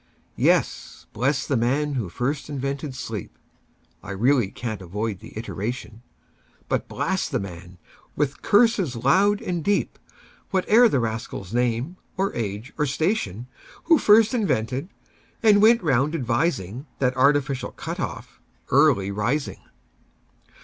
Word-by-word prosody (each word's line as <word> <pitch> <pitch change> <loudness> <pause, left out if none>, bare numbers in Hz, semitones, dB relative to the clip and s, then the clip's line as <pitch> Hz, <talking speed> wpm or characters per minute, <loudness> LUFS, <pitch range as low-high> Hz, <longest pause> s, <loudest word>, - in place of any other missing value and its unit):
Yes; - - +1
bless 135 +6 0
the 140 - 0
man 140 +5 +1
who 120 -9 -2
first 135 - -3
invented 140 0 -4
sleep(I 105 - -10
really 115 +2 +2
can't 110 -1 -5
avoid 100 +3 -4
the - - -12
iteration),But 115 +1 -6
blast 190 -3 -1
the 135 -5 -1
man, 90 -2 -9 0.4
with 145 -1 -1
curses 205 - +3
loud 190 - +3
and 175 -3 -2
deep, 205 +3 0 0.5
Whate'er 220 +5 +4
the 140 - +1
rascal's 110 -4 -4
name, 125 +7 0 0.2
or 195 +1 0
age, 105 +3 -4
or 150 - +2
station, 135 - -1 0.4
Who 325 -3 +5
first 215 +2 +5
invented, 135 - -1 0.5
and 210 -2 +6
went 230 +1 +5
round 145 +1 +2
advising, 125 - -1
That 125 -2 +1
artificial 140 0 +2
cut - - -6
off, - - -6 0.3
Early 130 -9 +4
Rising! 115 +9 -1
135 Hz, 120 wpm, -24 LUFS, 115-165 Hz, 0.5 s, and